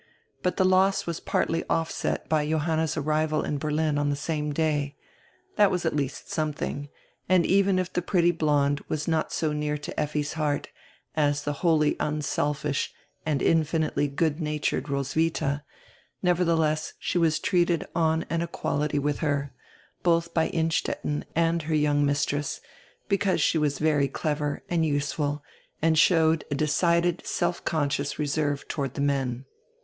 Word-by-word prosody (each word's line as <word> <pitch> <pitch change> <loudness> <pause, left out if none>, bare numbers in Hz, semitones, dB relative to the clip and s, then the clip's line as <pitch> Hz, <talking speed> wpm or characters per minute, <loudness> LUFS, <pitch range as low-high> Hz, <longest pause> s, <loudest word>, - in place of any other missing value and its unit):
But 180 - -1
die - - +4
loss 185 +1 +3
was 170 -2 -3
partly 165 0 0
offset 165 -1 -1
by 150 -2 +1
Johanna's 160 0 0
arrival 155 +1 +1
in 145 - -2
Ber 155 - -2
lin 150 -1 +1
on 145 0 +1
die 145 - +1
same 150 0 -2
day. 145 -2 0 0.6
That 205 -2 +6
was 180 -2 -1
at 160 - 0
least 140 -2 -3
something, 145 -2 -2 0.4
and 185 -2 +4
even 195 -1 +3
if 185 -1 -2
die 180 - 0
pretty 175 -1 +3
blonde 145 -3 +1
was 150 -1 -3
not 160 -1 0
so 155 -2 0
near 150 0 -1
to 145 - -6
Effi's 150 0 -1
heart 150 -2 -1 0.5
as 145 -2 +1
die 145 - -1
wholly 150 0 +2
unselfish 150 -1 -1 0.4
and 150 -3 0
infinitely 160 -2 +2
good 150 +2 0
natured 150 -1 -1
Ros 140 -1 -2
witha, 155 -3 0 0.6
nevertheless 165 -4 +1
she 175 - -1
was 160 -2 +3
treated 175 0 +1
on 160 -1 +2
an 165 - -1
equality 150 -3 -1
widi 145 0 0
her, 145 -3 -1 0.5
both 170 -1 +2
by 160 - +2
Innstetten 160 -2 -1
and 165 0 +2
her 155 +1 -1
young 145 -1 +2
mistress, 145 0 0 0.5
because 200 -1 +1
she 160 - +2
was 145 -2 +1
very 150 -2 +2
clever 150 +1 -2
and 170 -2 +1
useful 145 -1 -1 0.4
and 160 0 +3
showed 160 -1 +4
a 145 - -1
decided, 170 +4 +2
self 175 0 -1
conscious 145 -3 -1
reserve 145 -1 -1
toward 135 -3 -3
die - - -3
men. 135 -3 -1
155 Hz, 155 wpm, -26 LUFS, 145-165 Hz, 0.6 s, That